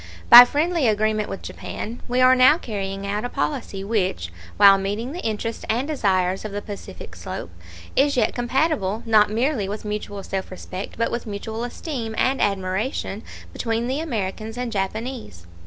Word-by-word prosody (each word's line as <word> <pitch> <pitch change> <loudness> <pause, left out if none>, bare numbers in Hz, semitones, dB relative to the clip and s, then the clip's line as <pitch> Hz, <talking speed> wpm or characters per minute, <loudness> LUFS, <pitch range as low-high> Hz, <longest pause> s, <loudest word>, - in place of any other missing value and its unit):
By 245 +1 +13
friendly 310 +1 +1
agreement 215 0 +1
with 195 - -6
Japan, 230 +3 -7
we 250 +1 +1
are 255 0 +7
now 260 +5 +6
carrying 195 - -5
out 205 +1 -2
a 245 - -3
policy 235 -11 -3
which, 185 - -1 0.2
while 200 -1 +8
meeting 205 +6 -3
the 350 +4 -6
interests 225 +1 -3
and 240 +5 0
desires 190 -10 0
of 215 - -5
the 205 +1 -4
Pacific 205 -2 -9
slope, 85 - -7 0.4
is 280 -1 +3
yet 225 - +2
compatible, 245 - 0
not 215 -2 +4
merely 225 -2 0
with 210 +1 -5
mutual 205 -1 -4
self 190 0 -4
respect, 185 +1 -7
but 230 - 0
with 235 0 -4
mutual 220 +2 -5
esteem 240 -3 -5
and 265 +1 +1
admiration 195 +3 -1 0.3
between 230 0 -1
the 260 +4 -1
Americans 220 -6 -4
and 245 -1 -3
Japanese. 210 - -4
220 Hz, 165 wpm, -23 LUFS, 200-250 Hz, 0.4 s, By